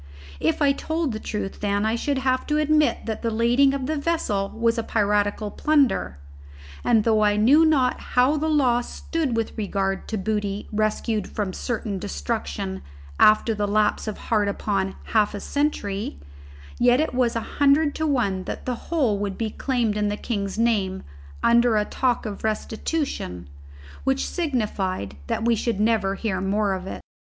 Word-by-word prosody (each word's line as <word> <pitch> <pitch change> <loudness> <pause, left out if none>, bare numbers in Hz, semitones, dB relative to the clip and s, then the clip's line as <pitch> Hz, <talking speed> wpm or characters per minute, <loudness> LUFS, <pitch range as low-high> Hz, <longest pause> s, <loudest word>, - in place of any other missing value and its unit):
If 160 - +1
I 280 - +5
told 315 +1 -2
the 215 - -4
truth, 210 -3 -4
then 205 0 0
I 220 - +1
should 280 +4 -1
have 260 -1 0
to 300 - +1
admit 305 0 +2
that 220 -1 -4
the 230 - 0
lading 240 +5 +3
of 270 -2 -3
the 310 +3 -1
vessel 250 -11 -1
was 230 +1 0
piratical 205 -1 +1
plunder; 280 - +1 0.7
and 225 -3 +3
though 220 -1 +3
I 205 0 +3
knew 270 +10 +6
not 265 -5 +2 0.2
how 255 +4 +4
the 310 +1 0
law 255 -6 +3
stood 280 0 -3
with 225 - -2
regard 195 -2 -2
to 220 - -2
booty 205 0 -2
rescued 215 0 -1
from 200 -3 -3
certain 215 -4 -3
destruction 70 - -4 0.4
after 215 +1 +5
the 205 -1 -1
lapse 210 +2 +1
of 215 - -3
hard 210 -3 0
upon 195 -1 -1 0.2
half 210 -2 +3
a - - -4
century, 205 - -2 0.6
yet 245 +1 +4
it 310 - 0
was 245 -2 +1
a 230 - -5
hundred 290 +1 +4
to 315 - 0
one 205 -10 0
that - - -6
the 255 - -1 0.2
whole 260 -12 +1
would 200 -1 -3
be 225 -2 -2
claimed 240 -5 -1
in 210 0 0
the 205 0 -2
king's 200 -4 -3
name 205 -5 +1 0.4
under 235 -1 +4
a 210 - +2
talk 250 0 0
of 205 -2 -6
restitution, 220 - -3 0.6
which 270 0 0
signified 210 - -2
that 225 - -1
we 235 - +4
should 225 -1 -2
never 210 -3 +2
hear 195 -3 -2
more 200 +1 +1
of 190 0 -5
it. - - -6
220 Hz, 170 wpm, -24 LUFS, 205-260 Hz, 0.7 s, knew